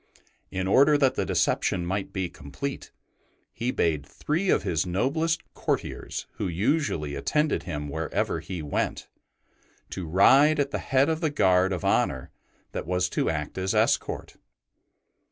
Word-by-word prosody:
In 95 0 -3
order 140 +9 +5
that 135 -2 +3
the - - -2
deception 90 -2 +1
might 95 +2 -2
be 95 -2 -2
complete, 85 - -6 0.6
he 120 +2 -2
bade 80 - 0
three 160 - -2
of - - +3
his 80 -3 0
noblest 155 - 0
courtiers - - -3
who 100 - -1
usually 90 - 0
attended 150 - 0
him 75 -1 -3
wherever 80 +2 -2
he 90 -4 -6
went, 75 - -2 0.8
to 95 -3 -5
ride 135 - +5
at 140 -1 0
the - - -2
head 135 +1 +2
of 160 0 -1
the 160 - +1
guard 95 -9 +3
of 90 -4 -3
honour 65 -1 +1 0.4
that - - -5
was 90 0 +1
to - - 0
act 75 +2 -3
as 95 +1 -1
escort. - - 0
95 Hz, 150 wpm, -26 LUFS, -, 0.8 s, order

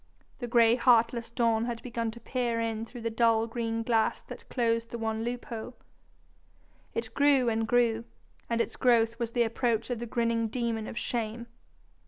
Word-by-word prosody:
The 245 - -4
gray 230 -1 +5
heartless 235 -1 +3
dawn 230 -2 +1
had 235 -1 -4
begun 230 -2 -2
to 230 +1 -9
peer 240 -2 -1
in 225 0 -2
through 240 +1 -9
the 230 0 -2
dull 225 0 +3
green 230 -1 -2
glass 225 -1 +1
that - - -11
closed 230 -2 0
the 235 - -5
one 225 -1 -2
loophole. 240 0 -5 1.2
It 225 -1 -3
grew 280 -4 +4
and 225 0 0
grew, 230 -1 +2 0.4
and 235 0 0
its 230 - -1
growth 230 -2 +3
was 235 -1 -1
the 240 - +3
approach 230 0 0
of 240 - -2
the 240 - -5
grinning 230 -1 0
demon 230 -1 -2
of - - -7
shame. 235 -1 -3
230 Hz, 175 wpm, -29 LUFS, 225-240 Hz, 1.2 s, gray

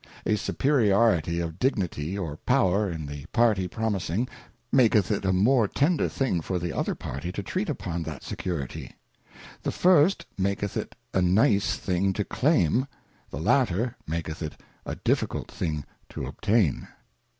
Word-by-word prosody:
A 110 - +3
superiority 105 - +2
of 85 0 -4
Dignity 95 - -1
or 80 -6 -4
Power 105 -5 +2
in 80 -3 -5
the 70 +1 -7
party 110 -5 +2
promising 105 +2 -1 0.4
maketh 110 -6 +4
it 100 - 0
a 95 - +3
more 110 +5 +4
tender 150 - +1
thing 125 -11 0
for 90 +3 -2
the 85 -1 -3
other - - -1
party 70 +8 -5
to 100 - -5
treat 185 - -2
upon 85 - -3
that 80 -3 -6
security. 80 -8 -5 0.7
The - - -1
first 180 0 +4
maketh 100 +1 -1
it - - -4 0.2
a 95 - +2
nice 100 +2 +3
thing 95 +1 0
to 105 +1 -2
claim, 130 - +2 0.4
the - - -6
latter 115 - +2
maketh 80 0 -4
it 75 -2 -5 0.3
a - - -3
difficult - - -1
thing 75 -5 -3 0.2
to - - -5
obtain. 105 - +1
95 Hz, 150 wpm, -26 LUFS, 85-115 Hz, 0.7 s, maketh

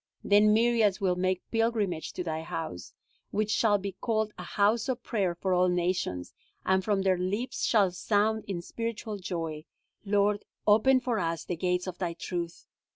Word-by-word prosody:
Then 205 +1 +5
myriads 220 -3 +3
will 185 -3 +1
make 185 0 0
pilgrimage 225 -7 0
to 180 - -3
Thy 160 -2 -3
house, 160 - -5 0.4
which 215 +1 -1
shall 210 -2 +3
be 200 0 -4
called 220 -2 0
a - - -8
house 215 +5 +1
of 250 -2 -2
prayer 190 -6 0
for 185 +2 -1
all 180 0 +4
nations, 175 - -1 0.3
and 190 0 +2
from 200 -1 +1
their 185 -2 +2
lips 205 +7 -2
shall 200 -5 +4
sound 215 +4 +1
in 180 -4 -4
spiritual 230 0 -4
joy: 165 -4 -4 0.4
Lord, 205 0 +2 0.2
open 225 +5 +5
for 240 -4 -1
us 165 -2 -2
the 175 - -2
gates 180 +1 0
of 185 -2 -6
thy 170 -2 -2
truth. 170 0 -5
195 Hz, 170 wpm, -29 LUFS, 180-215 Hz, 0.4 s, Then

